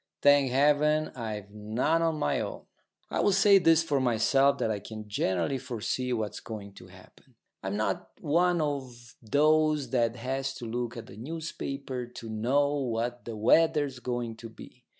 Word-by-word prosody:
Thank 145 -2 +6
Heaven, 150 +3 +3
I've 105 -4 -6
none 110 +10 0
of 165 -1 +1
my 75 - 0
own. - - -5 0.5
I - - -1
will - - +3
say 195 +1 +6
this 165 -2 +4
for 145 -4 0
myself, 130 +3 +3
that 110 - 0
I 105 - -2
can 110 +1 -9
generally 95 +4 -1
foresee 125 0 -3
what's 110 -4 -2
going 100 -3 -8
to - - -13
happen. - - -19 0.3
I'm - - -3
not - - -2
one 175 +2 +2
of 130 -5 -4
those 150 +2 +2
that 120 -2 +1
has 135 +2 -3
to 120 - -7
look 120 +1 -3
at 115 - -9
a 95 - -12
newspaper 135 -2 -5
to 120 -2 -9
know 135 +7 +1
what 120 -1 -2
the 115 - -5
weather's 145 +4 +3
going 120 -2 -3
to 115 0 -9
be. 125 +2 -14
125 Hz, 170 wpm, -28 LUFS, 115-145 Hz, 0.5 s, Thank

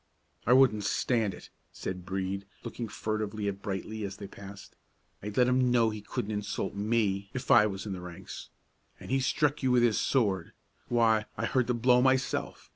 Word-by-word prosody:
"I 125 - +6
wouldn't 125 -5 +5
stand 110 -1 0
it," - - -14 0.2
said 90 -1 -6
Brede, 95 +1 -3 0.2
looking 115 - -5
furtively 105 0 -3
at 100 0 -3
Brightly 105 +3 -4
as 100 -1 -5
they 100 - -7
passed. 100 0 -11 0.5
"I'd 105 +1 -6
let 125 -1 +5
him 125 0 +3
know 115 -2 +3
he 105 -1 -6
couldn't 105 0 -4
insult 105 -1 -3
me 100 -2 0
if 130 0 -2
I 105 - +7
was 95 -1 -5
in 100 - -3
the 90 - -6
ranks. 90 +1 -9 0.5
And - - -9
he 135 - +3
struck 145 +2 +1
you 130 - +1
with 125 -1 +4
his 115 -3 +3
sword; 100 -10 +1 0.3
why, 115 -2 +3
I - - -1
heard 130 -2 +1
the 125 - +1
blow 125 +1 +4
myself. 130 0 0
110 Hz, 190 wpm, -29 LUFS, 100-125 Hz, 0.5 s, I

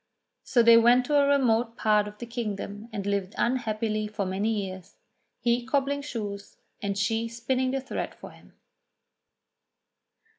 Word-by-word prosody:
So 240 - +3
they 230 0 +8
went 240 +2 +5
to 295 - 0
a 280 - +4
remote 240 -4 +2
part 210 -1 +3
of 210 0 -10
the 240 - -6
kingdom 215 -2 -5
and 200 -3 -4
lived 200 -1 -2
unhappily 220 -3 0
for 210 -1 -3
many 190 +4 -1 0.2
years, 185 +1 -9 0.4
he 240 0 +1
cobbling 280 +2 0
shoes, 205 -7 -6 0.2
and 200 -1 -2
she 225 +3 0
spinning 250 +3 -1
the 270 +1 -1
thread 265 - -5
for - - -11
him. - - -19
230 Hz, 150 wpm, -27 LUFS, 205-245 Hz, 0.4 s, they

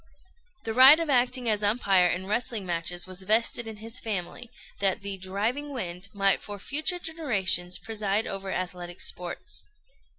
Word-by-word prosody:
The 225 - -3
right 265 +6 +9
of 330 -3 -1
acting 250 -1 +1
as 215 -2 +2
umpire 200 -4 +3
in 180 +2 -2
wrestling 220 0 -1
matches 175 0 0
was 185 0 -5
vested 225 +3 +2
in 220 -1 -7
his 225 +3 -3
family, 220 +3 -5 0.3
that 195 0 +1
the 200 -1 -3
"Driving 220 +10 -3
Wind" 185 -6 -5
might 195 -2 +2
for 205 -1 -7
future 305 - -1
generations 210 - 0
preside 210 +1 -1
over 195 0 -5
athletic 175 -1 -5
sports. 175 -1 -5
205 Hz, 155 wpm, -27 LUFS, 185-240 Hz, 0.3 s, right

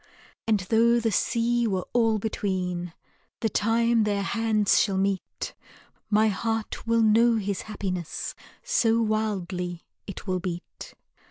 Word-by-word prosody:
And 215 -3 +2
tho' 230 +5 +3
the 225 -1 0
sea 235 +3 +1
were 190 -3 -1
all 225 -2 +3
between, 185 -4 -2 0.5
The 225 - +1
time 230 +2 +2
their 205 -1 0
hands 220 -1 +2
shall 195 -2 +1
meet, 195 -1 -2 0.6
My 215 +1 +4
heart 225 +2 -2
will 230 0 +3
know 230 +2 +5
his 200 -3 -2
happiness, 185 -5 -4 0.3
So 230 - +2
wildly 190 -6 -2 0.2
it 195 - -7
will 185 -2 -1
beat. 175 -1 -7
215 Hz, 125 wpm, -26 LUFS, 190-225 Hz, 0.6 s, know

